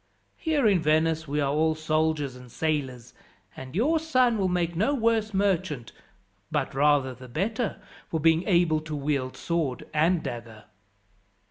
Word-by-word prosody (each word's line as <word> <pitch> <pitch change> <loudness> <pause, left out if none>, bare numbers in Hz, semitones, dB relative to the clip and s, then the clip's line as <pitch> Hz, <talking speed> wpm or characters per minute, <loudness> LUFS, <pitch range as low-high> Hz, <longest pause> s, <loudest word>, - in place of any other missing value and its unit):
Here 310 -6 0
in 200 -4 +4
Venice 160 +1 +1
we 145 +2 -1
are 140 0 0
all 160 +1 +2
soldiers 155 -3 0
and 125 -1 -13
sailors, 130 -6 -2 0.4
and 130 +2 -9
your 300 - +2
son 255 -8 +2
will 190 - +2
make 175 -2 -1
no 220 - +1
worse 225 -3 +1
merchant, 185 - -1 0.6
but - - -1
rather 140 -1 +3
the 130 +1 -12
better, 215 - -2 0.3
for 160 - -2
being 160 +1 +4
able 170 -5 +3
to 155 -1 -6
wield 140 -3 -2
sword 160 -7 -2
and 160 +3 +2
dagger. 115 -2 -7
160 Hz, 150 wpm, -26 LUFS, 140-190 Hz, 0.6 s, in